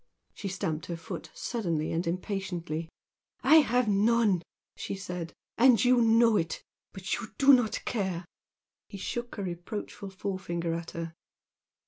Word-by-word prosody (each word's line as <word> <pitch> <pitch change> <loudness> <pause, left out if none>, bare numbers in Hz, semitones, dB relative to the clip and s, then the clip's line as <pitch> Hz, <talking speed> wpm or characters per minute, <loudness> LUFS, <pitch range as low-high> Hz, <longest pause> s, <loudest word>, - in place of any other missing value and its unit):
She 200 - -6
stamped 165 -4 -3
her 170 - -4
foot 165 - -7
suddenly 170 -10 -2
and 170 +1 -1
impatiently. 175 -3 -3 0.5
"I 315 - +8
have 250 -5 +4
none!" 210 -2 +3 0.3
she - - -4
said 180 -4 -5 0.3
"And 245 -3 +6
you 250 -1 +5
know 230 -1 +5
it! 165 -3 -2 0.3
But 190 0 -4
you 220 - -6
do 275 0 +7
not 230 -4 +2
care!" 190 -6 -2 0.6
He 200 - -7
shook 240 +5 -4
a 200 - -3
reproachful 190 +3 -5
forefinger 185 -3 -3
at 170 0 -4
her. 165 0 -4
195 Hz, 140 wpm, -29 LUFS, 170-230 Hz, 0.6 s, I